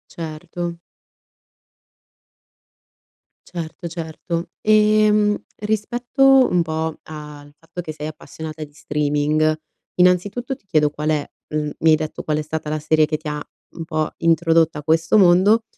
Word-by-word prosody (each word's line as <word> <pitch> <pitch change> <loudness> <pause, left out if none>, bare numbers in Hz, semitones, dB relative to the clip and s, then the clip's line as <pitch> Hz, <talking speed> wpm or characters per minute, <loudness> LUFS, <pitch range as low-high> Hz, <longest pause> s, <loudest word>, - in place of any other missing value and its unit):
Certo. 170 +1 -5 2.7
Certo, 170 0 -6
certo, 165 +1 -5
ehm, 215 -1 +4 0.2
rispetto 245 +5 +3
un 180 - +2
po' 160 -1 -3
al 150 -2 -10
fatto 165 +2 -8
che 160 - -6
sei 150 0 -6
appassionata 155 0 -8
di 145 - -11
streaming, 150 +1 0 0.4
innanzitutto 190 +9 +2
ti 200 - -27
chiedo 155 -5 +3
qual 150 +1 -3
è 150 -2 -1 0.2
mhmm, 150 -1 -1
mi 160 - +4
hai 155 - +7
detto 155 0 -5
qual 150 -1 0
è - - 0
stata 155 0 -4
la 155 - -1
serie 155 +1 +3
che 155 0 -1
ti 155 0 -9
ha 150 0 -3 0.3
un 165 -1 -7
po' 155 -1 -1
introdotta 165 -1 +3
a - - -9
questo 160 +6 +3
mondo 195 +4 +5
160 Hz, 140 wpm, -21 LUFS, 155-180 Hz, 2.7 s, hai